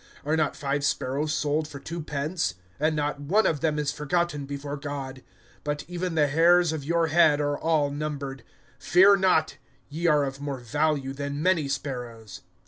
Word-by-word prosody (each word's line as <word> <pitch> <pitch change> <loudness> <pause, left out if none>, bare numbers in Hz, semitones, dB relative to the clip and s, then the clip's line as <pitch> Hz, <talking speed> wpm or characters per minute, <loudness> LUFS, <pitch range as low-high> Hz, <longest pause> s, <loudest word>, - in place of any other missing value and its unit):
(6)Are 155 +2 +1
not 155 -2 0
five 140 0 -2
sparrows 145 +2 -1
sold 155 0 0
for 140 -2 -9
two 165 +4 -6
pence? 150 - -2 0.2
And 155 +1 +1
not 145 -1 -1
one 195 +10 +2
of 155 - +1
them 155 -1 0
is 150 -1 0
forgotten 150 -1 -1
before 140 0 -5
God. 140 -2 -6 0.4
(7)But 145 0 -3
even 180 0 -3
the 150 -2 +4
hairs 165 +3 +4
of 155 -3 -4
your 170 +3 +1
head 155 -2 +5
are 145 0 0
all 155 -2 +1
numbered. 140 -2 -4 0.4
Fear 185 +7 +6
not; 180 -5 +2 0.3
ye 165 +4 -1
are 150 -3 +4
of 135 0 -4
more 140 -2 -3
value 135 +2 -1
than 140 +1 -4
many 175 -5 +2
sparrows. 120 -7 -5
150 Hz, 175 wpm, -26 LUFS, 140-160 Hz, 0.4 s, Fear